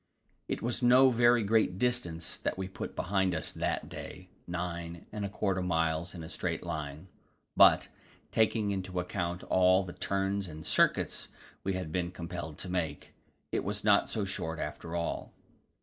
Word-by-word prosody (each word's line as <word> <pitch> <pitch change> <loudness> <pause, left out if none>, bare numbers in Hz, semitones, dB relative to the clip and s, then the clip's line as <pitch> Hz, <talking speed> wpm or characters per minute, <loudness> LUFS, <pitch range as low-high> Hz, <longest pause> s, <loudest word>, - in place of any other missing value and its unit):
It - - -3
was 120 +1 -1
no 130 +2 +7
very 120 -1 +5
great 105 -3 +2
distance 100 -9 -1
that - - -2
we 95 -1 -3
put 95 - -6
behind 95 -1 +1
us 80 - -3
that - - -2
day 90 0 -9 0.2
nine 85 -1 -4
and 105 - -4
a 100 - -1
quarter 95 -2 0
miles 80 0 0
in 85 - -6
a - - -7
straight 85 -1 -3
line. 80 -1 -5 0.5
But, - - +7 0.4
taking 110 -2 +2
into 95 -2 -2
account 90 0 -2
all 95 +1 +4
the 90 -2 -7
turns 100 0 -1
and 80 -1 -9
circuits - - +2 0.4
we 95 - 0
had 90 -4 -3
been 85 0 0
compelled 85 -3 -6
to 95 - -7
make, 80 -5 -3 0.4
it - - 0
was - - -3
not - - +4
so - - -1
short 80 0 -3
after 85 0 -5
all. 85 -1 -3
90 Hz, 165 wpm, -31 LUFS, 85-100 Hz, 0.5 s, no